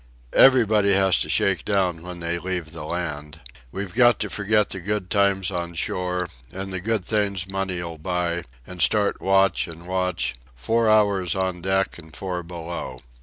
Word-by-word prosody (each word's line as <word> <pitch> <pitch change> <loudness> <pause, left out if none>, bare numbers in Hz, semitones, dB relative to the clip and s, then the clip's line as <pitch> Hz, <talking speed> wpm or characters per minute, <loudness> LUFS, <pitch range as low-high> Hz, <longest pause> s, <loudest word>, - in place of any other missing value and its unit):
"Everybody 110 -6 +5
has 95 -1 +4
to - - -2
shake 95 -4 +1
down 95 -5 0
when 90 0 -8
they 85 +1 -1
leave 90 -3 -4
the 80 -1 -7
land. 75 -3 -4 0.3
We've 95 -2 -5
got 120 -1 +5
to - - -3
forget 105 0 +1
the 95 - -3
good 100 0 -3
times 100 -2 +2
on 85 -1 -4
shore, 90 +2 -2 0.2
and 95 0 -6
the 95 - -3
good 110 -2 -1
things 100 -4 0
money'll 90 -4 -3
buy, 85 0 -2 0.2
and 90 -1 -7
start 100 +5 +3
watch 95 0 +3
and 85 +1 -11
watch, 90 -1 -1 0.2
four 115 - +1
hours 100 -5 +3
on 95 -2 -2
deck 95 0 0
and 80 -1 -11
four 90 0 -4
below. 85 -6 -6
95 Hz, 170 wpm, -23 LUFS, 85-100 Hz, 0.3 s, Everybody